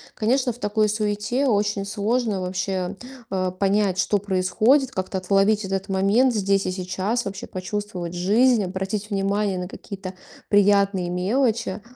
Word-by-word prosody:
Конечно, 250 +2 +1
в - - -15
такой 215 -1 +1
суете 215 +5 -1
очень 205 -3 +1
сложно 210 0 -1
вообще, 185 +1 -3 0.3
э, 190 -1 -1 0.2
понять, 195 -1 +2
что 205 +1 +2
происходит, 215 +8 +2
как-то 190 -1 -3
отловить 195 +2 +2
этот 195 +1 -3
момент 205 +7 +3
здесь 195 -2 +1
и 185 - -1
сейчас, 190 +5 -2
вообще 195 0 -5
почувствовать 185 -2 -5
жизнь, 215 +5 +3
обратить 195 +3 -3
внимание 200 -1 0
на 180 - -4
какие-то 195 -1 -8 0.4
приятные 200 -3 +3
мелочи. 215 +2 0
200 Hz, 135 wpm, -23 LUFS, 190-215 Hz, 0.4 s, момент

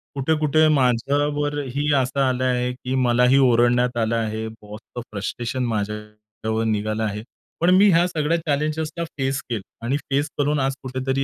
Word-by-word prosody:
कुठे 140 +3 +1
कुठे 155 +1 +3
माझ्यावरही 145 +2 0
असं 130 0 0
आलं 130 0 0
आहे 125 -1 +1
की 125 +1 -4
मलाही 125 +2 +4
ओरडण्यात 120 +1 +3
आलं 115 0 +1
आहे. 110 -1 -2
बॉसचे 110 +2 -10
फ्रस्ट्रेशन 120 +5 -3
माझ्यावर 105 +1 -4
निघालं 110 0 -1
आहे. 105 0 -3 0.4
पण 170 - +4
मी 200 +2 +6
ह्या 175 +1 +4
सगळ्या 165 -1 0
चॅलेंजला 155 +1 -2
फेस 135 0 -1
केलं 115 -4 -2 0.2
आणि 135 +4 +1
फेस 145 +1 -1
करून 145 +1 +1
आज 135 0 0
कुठेतरी 130 +1 -2
130 Hz, 150 wpm, -22 LUFS, 110-145 Hz, 0.4 s, मी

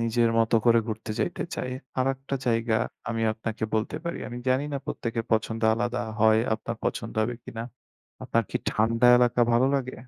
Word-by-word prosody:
নিজের 115 0 +2
মতো 115 0 +3
করে 115 0 +6
ঘুরতে 110 0 -5
যাইতে 175 - -1
চায়। 125 - -3 0.3
আরেকটা 135 +1 -1
জায়গা 115 -1 +1 0.3
আমি 115 -1 -1
আপনাকে 110 0 -4
বলতে 110 +7 -1
পারি। 170 - -3
আমি 120 0 -6
জানি 130 +3 +2
না, - - 0
প্রত্যেকের 115 -1 -3
পছন্দ 110 0 0
আলাদা 120 +2 -1 0.2
হয়, 110 0 +6 0.2
আপনার 110 - -5
পছন্দ - - -2
হবে 120 +3 -1
কিনা? 115 - -6 0.6
আপনার 115 - +1
কি - - 0
ঠান্ডা 115 +3 +2
এলাকা 125 0 +3
ভালো 120 +3 +4
লাগে? 130 -2 -1
115 Hz, 175 wpm, -26 LUFS, 110-125 Hz, 0.6 s, করে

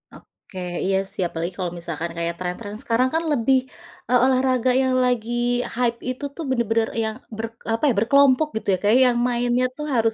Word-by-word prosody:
Oke. 185 - -13 0.3
Iya 190 0 +2
sih, - - -5
apalagi 170 +2 -4
kalau 175 -2 -2
misalkan 170 0 -5
kayak 170 0 -1
tren-tren 205 +4 -5
sekarang 245 +3 +2
kan 330 - +1
lebih, 265 0 +3 0.5
eee, 250 -1 +5
olahraga 255 -1 +2
yang 260 0 +1
lagi 240 -2 0 0.4
hype 235 -1 0
itu 255 +3 -5
tuh 330 - -5
bener-bener 230 -3 +1
yang 220 0 -2 0.2
ber 225 - -2 0.3
apa 225 - -3
ya? - - +3
Berkelompok 280 +5 +4
gitu 220 - -4
ya, - - +2
Kak, 205 - +3
ya, - - +6
yang 240 - -1
mainnya 245 +1 +1
tuh 300 - -5
harus 225 -1 +2
235 Hz, 190 wpm, -22 LUFS, 205-255 Hz, 0.5 s, ya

